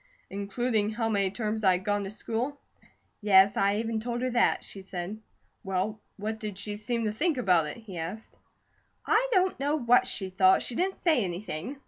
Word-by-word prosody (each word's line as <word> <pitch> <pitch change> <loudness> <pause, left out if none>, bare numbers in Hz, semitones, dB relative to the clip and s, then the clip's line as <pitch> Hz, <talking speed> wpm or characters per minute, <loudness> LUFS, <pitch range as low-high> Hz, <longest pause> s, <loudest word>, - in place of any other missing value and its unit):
"Including 210 +2 -1
how 225 +1 -1
many 200 -3 +2
terms 215 +1 -3
I'd 185 -1 +3
gone 205 -1 0
to - - -5
school?" 235 +7 -3 0.6
"Yes, 200 -1 +6
I 200 +1 +2
even 225 +1 -1
told 240 +2 -3
her 255 - 0
that," 240 0 +2
she 195 - -7
said. 190 +2 -6 0.4
"Well, 195 +3 -2 0.2
what 215 +2 -4
did 210 -3 -5
she 205 +1 -4
seem 230 +2 -2
to 210 - 0
think 300 +7 0
about 180 -9 +3
it?" 150 - -6
he 205 -7 -8
asked. 185 +7 -6 0.7
"I 465 +4 +3
don't 375 - +2
know 290 +2 +1
what 250 -2 +4
she 190 -6 -3
thought, 190 0 +4
she - - -3
didn't 375 +9 0
say 310 - +2
anything. 185 - -5
215 Hz, 185 wpm, -28 LUFS, 195-240 Hz, 0.7 s, Yes